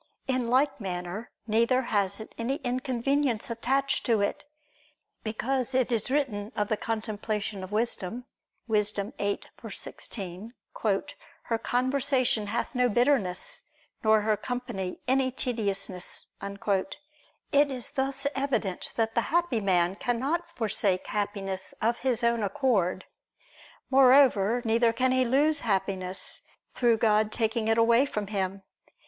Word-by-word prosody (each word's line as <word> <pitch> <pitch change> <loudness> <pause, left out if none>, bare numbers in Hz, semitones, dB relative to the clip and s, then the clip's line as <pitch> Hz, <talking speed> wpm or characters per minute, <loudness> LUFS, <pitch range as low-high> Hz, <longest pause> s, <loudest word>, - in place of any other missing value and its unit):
In 255 -3 0
like 265 +1 +2
manner 180 +3 -4 0.2
neither 235 +4 +3
has 200 -4 0
it 220 - -9
any 235 +4 -1
inconvenience 255 -1 0
attached 270 +4 0
to 230 -3 +3
it; 200 - -1 0.8
because 255 +4 -1
it 260 -1 +2
is 230 -1 0
written 240 -7 -1
of 210 0 -1
the 215 - +2
contemplation 215 -2 -3
of 185 - -8
wisdom 230 +1 -2 0.4
(Wis. 210 -2 +2
8:16): 200 0 -4 0.9
"Her 230 - -1
conversation 255 -3 +1
hath 230 +3 -1
no 250 -1 +3
bitterness, 240 -6 +1 0.4
nor 220 -1 +5
her 215 0 +2
company 235 -5 -4
any 260 0 +3
tediousness." 200 -8 -2 0.2
It 200 +7 -2 0.7
is 255 -3 -4
thus 270 +1 -2
evident 265 -9 -2
that 225 -1 0
the 235 - +2
happy 335 -8 +1
man 185 -1 +2
cannot 270 +10 -1
forsake 205 -5 0
Happiness 195 -2 -3
of 230 +2 +1
his 250 -2 0
own 235 -1 +2
accord. 195 -3 +1 0.9
Moreover, 250 -4 +5
neither 230 +1 +3
can 255 +2 +2
he 255 0 +4
lose 290 +5 +3
Happiness, 190 -2 -2 0.3
through 235 -2 +3
God 215 -1 +3
taking 220 0 0
it 225 0 +3
away 235 +4 +5
from 210 -5 -3
him. 195 -1 -3
230 Hz, 125 wpm, -28 LUFS, 205-255 Hz, 0.9 s, nor